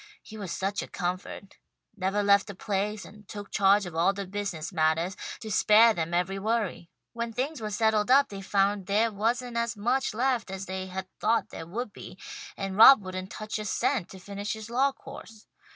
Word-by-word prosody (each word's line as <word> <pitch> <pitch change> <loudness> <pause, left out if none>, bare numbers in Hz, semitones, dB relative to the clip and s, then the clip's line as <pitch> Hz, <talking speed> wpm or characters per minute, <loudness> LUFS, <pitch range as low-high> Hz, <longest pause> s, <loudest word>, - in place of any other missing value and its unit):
He 220 - -12
was 200 -5 -6
such 195 +2 -2
a - - -7
comfort. 185 +2 -5 0.4
Nevah 195 +1 0
left 200 -1 +4
the 200 - -7
place, 205 +2 -2
and 210 -1 -15
took 205 -1 -8
charge 200 +1 +4
of 175 - -7
all 170 +4 +3
the 200 0 -5
business 185 -5 -4
mattahs, 160 +4 +1 0.3
to 220 - -6
spare 220 +2 +6
them 165 -3 -3
every 180 +3 0
worry. 210 -5 -2 0.2
When 235 0 -3
things 260 +4 -3
were 215 - -3
settled 215 +1 +1
up 275 +2 +5
they 195 -1 -7
found 195 0 +1
there 215 +3 +2
wasn't 235 +4 -1
as 235 -1 -1
much 245 +3 0
left 245 -3 0
as 190 0 -5
they 190 0 -5
had 190 0 -5
thought 230 - +1
there 165 - -8
would 220 +4 -5
be, - - -11 0.4
and 195 -1 -4
Rob 230 0 +9
wouldn't 185 0 -6
touch 215 0 -5
a 215 - -5
cent 215 0 0
to 190 - -11
finish 200 +2 -5
his 220 +1 -8
law 270 +3 +3
course. 220 -4 -12
205 Hz, 200 wpm, -28 LUFS, 190-225 Hz, 0.4 s, Rob